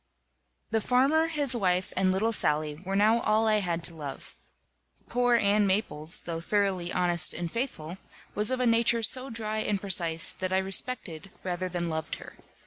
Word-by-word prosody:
The 220 Hz, -1 st, +1 dB
farmer, 275 Hz, +8 st, +2 dB
his 290 Hz, -6 st, -2 dB
wife, 185 Hz, -4 st, 0 dB
and 185 Hz, 0 st, +2 dB
little 215 Hz, +5 st, 0 dB
Sally 150 Hz, -4 st, -1 dB
were 195 Hz, +1 st, -3 dB
now 215 Hz, +3 st, +4 dB
all 220 Hz, +1 st, +2 dB
I 215 Hz, -1 st, +3 dB
had 170 Hz, -4 st, -2 dB
to 170 Hz, -, +2 dB
love. 145 Hz, -4 st, -8 dB, 0.7 s
Poor 245 Hz, 0 st, +2 dB
Ann 205 Hz, -2 st, +3 dB
Maples, 190 Hz, -5 st, -1 dB
though 165 Hz, -1 st, -4 dB
thoroughly 190 Hz, -2 st, -1 dB
honest 175 Hz, -2 st, +2 dB
and 170 Hz, -1 st, -4 dB
faithful, 190 Hz, -, -5 dB, 0.3 s
was 210 Hz, +1 st, +1 dB
of 260 Hz, 0 st, 0 dB
a 250 Hz, -, +1 dB
nature 230 Hz, 0 st, +3 dB
so 255 Hz, +4 st, +3 dB
dry 220 Hz, -1 st, -3 dB
and 210 Hz, -2 st, -1 dB
precise 170 Hz, -4 st, +2 dB
that 185 Hz, 0 st, -4 dB
I 190 Hz, -, +2 dB
respected 190 Hz, -2 st, -2 dB
rather 185 Hz, 0 st, -3 dB
than 175 Hz, -1 st, -3 dB
loved 160 Hz, -1 st, -3 dB
her. -, -, -12 dB
195 Hz, 175 wpm, -28 LUFS, 175-230 Hz, 0.7 s, now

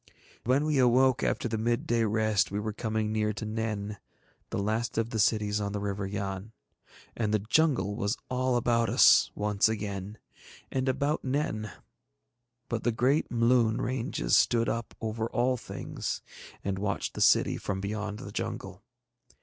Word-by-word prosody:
When 130 Hz, +5 st, +2 dB
we 150 Hz, -3 st, +1 dB
awoke 130 Hz, +1 st, +4 dB
after -, -, 0 dB
the 110 Hz, -1 st, -2 dB
midday 115 Hz, 0 st, +1 dB
rest 110 Hz, -2 st, +2 dB
we 100 Hz, -, -2 dB
were 110 Hz, 0 st, -3 dB
coming 110 Hz, 0 st, -2 dB
near 105 Hz, 0 st, 0 dB
to 110 Hz, -, -5 dB
Nen, 105 Hz, -1 st, -3 dB, 0.5 s
the -, -, -3 dB
last 110 Hz, +3 st, -1 dB
of 115 Hz, +1 st, 0 dB
the 110 Hz, -, -2 dB
cities 105 Hz, 0 st, +2 dB
on 100 Hz, 0 st, -2 dB
the 105 Hz, -, -2 dB
River 100 Hz, -1 st, -3 dB
Yann. 100 Hz, +1 st, -4 dB, 0.6 s
And 110 Hz, -3 st, -1 dB
the 110 Hz, -, +4 dB
jungle 130 Hz, -6 st, +2 dB
was 105 Hz, +1 st, -1 dB
all 130 Hz, 0 st, 0 dB
about 115 Hz, -1 st, +2 dB
us -, -, +6 dB
once 105 Hz, 0 st, +2 dB
again, 105 Hz, -1 st, -4 dB, 0.5 s
and 130 Hz, 0 st, 0 dB
about 140 Hz, +4 st, 0 dB
Nen; 130 Hz, -6 st, -2 dB, 1.0 s
but 115 Hz, -2 st, -3 dB
the 120 Hz, -, +2 dB
great 130 Hz, +6 st, +1 dB
Mloon 115 Hz, -1 st, +3 dB
ranges 115 Hz, -, 0 dB
stood 115 Hz, -1 st, +3 dB
up 115 Hz, -1 st, -3 dB
over 110 Hz, 0 st, -2 dB
all 125 Hz, +3 st, +1 dB
things, 125 Hz, -, -5 dB, 0.4 s
and 95 Hz, -1 st, -2 dB
watched 100 Hz, 0 st, -2 dB
the -, -, -5 dB
city -, -, +4 dB
from 95 Hz, -2 st, -3 dB
beyond 105 Hz, +1 st, -3 dB
the -, -, -8 dB
jungle. -, -, -5 dB
110 Hz, 160 wpm, -29 LUFS, 105-120 Hz, 1.0 s, us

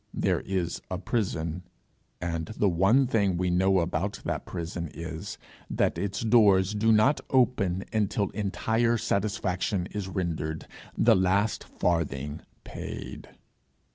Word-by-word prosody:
There -, -, +1 dB
is 90 Hz, -3 st, -2 dB
a 90 Hz, -, -2 dB
prison, 90 Hz, -5 st, -2 dB, 0.6 s
and 85 Hz, -2 st, -3 dB
the 105 Hz, -, +3 dB
one 100 Hz, +10 st, +4 dB
thing 100 Hz, -7 st, +1 dB
we 90 Hz, 0 st, 0 dB
know 95 Hz, +1 st, +3 dB
about 85 Hz, +4 st, -2 dB
that -, -, -3 dB
prison 85 Hz, -1 st, -4 dB
is, 80 Hz, -1 st, -6 dB, 0.3 s
that -, -, 0 dB
its 100 Hz, +1 st, -2 dB
doors 105 Hz, -4 st, +5 dB
do 110 Hz, +2 st, +3 dB
not 110 Hz, +7 st, +4 dB
open 100 Hz, -8 st, +2 dB
until 105 Hz, -2 st, 0 dB
entire 115 Hz, +3 st, +1 dB
satisfaction 100 Hz, -3 st, -1 dB
is 105 Hz, -2 st, -4 dB
rendered, 80 Hz, -5 st, -3 dB, 0.3 s
the -, -, +5 dB
last 95 Hz, +4 st, +1 dB
farthing 75 Hz, -3 st, -1 dB, 0.2 s
paid. -, -, -7 dB
95 Hz, 125 wpm, -28 LUFS, 85-105 Hz, 0.6 s, doors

